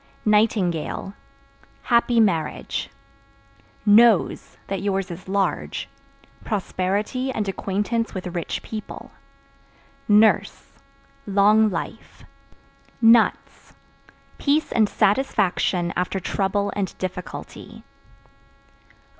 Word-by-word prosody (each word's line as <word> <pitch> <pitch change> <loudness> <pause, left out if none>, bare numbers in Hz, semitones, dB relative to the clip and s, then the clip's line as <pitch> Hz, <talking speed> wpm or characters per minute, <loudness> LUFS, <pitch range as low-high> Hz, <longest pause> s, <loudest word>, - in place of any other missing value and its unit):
Nightingale 200 -4 +1 0.7
Happy 235 0 +2
marriage. 170 -8 0 1.0
Nose 215 -1 +4
(That 195 -1 -4
yours 195 -2 -2
is 175 +2 -9
large) 195 0 -2 0.6
prosperity 210 +5 -2
and 215 -5 -3
acquaintance 205 +4 -2
with 185 - -5
rich 175 -2 -4
people. 215 -1 -8 1.0
Nurse 215 +1 +3 0.6
Long 210 +2 +4
life. 170 -4 -7 0.8
Nuts 230 -1 +3 0.7
Peace 300 +2 +1
and 215 -3 +2
satisfaction 190 -6 +1
after 180 +2 -1
trouble 200 +2 -1
and 195 -3 -3
difficulty. 180 -1 -7
200 Hz, 80 wpm, -23 LUFS, 185-220 Hz, 1.0 s, Nose